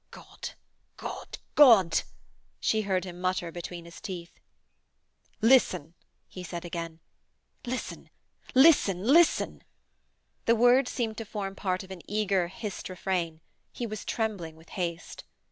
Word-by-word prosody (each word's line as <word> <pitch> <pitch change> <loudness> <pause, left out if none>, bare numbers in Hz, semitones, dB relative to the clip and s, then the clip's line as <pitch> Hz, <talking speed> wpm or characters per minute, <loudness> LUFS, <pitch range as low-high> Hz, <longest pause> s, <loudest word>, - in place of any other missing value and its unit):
'God! - - -9 0.5
God! - - -7 0.2
God!' 220 - +7 0.6
she 220 - +2
heard 190 -3 0
him 180 -1 -8
mutter 185 -2 -1
between 175 0 -7
his 170 0 -12
teeth. 175 -4 -7 1.0
'Listen!' 225 - +4 0.3
he 185 - -9
said 175 -1 -6
again. 165 -1 -5 0.7
'Listen! 255 +1 -5 0.5
listen! 255 - +6
listen!' 315 +9 +4 0.8
The 230 - +5
words 245 +3 +5
seemed 225 -3 -2
to 225 - -5
form 200 -2 -4
part 185 -1 -1
of 190 - -12
an 185 -2 -8
eager, 200 -4 +1
hissed 205 +1 -6
refrain. 175 -3 -2 0.3
He 240 - -4
was 215 -2 -5
trembling 200 -9 -3
with 160 +1 -18
haste. 170 -3 -4
190 Hz, 130 wpm, -28 LUFS, 175-225 Hz, 1.0 s, God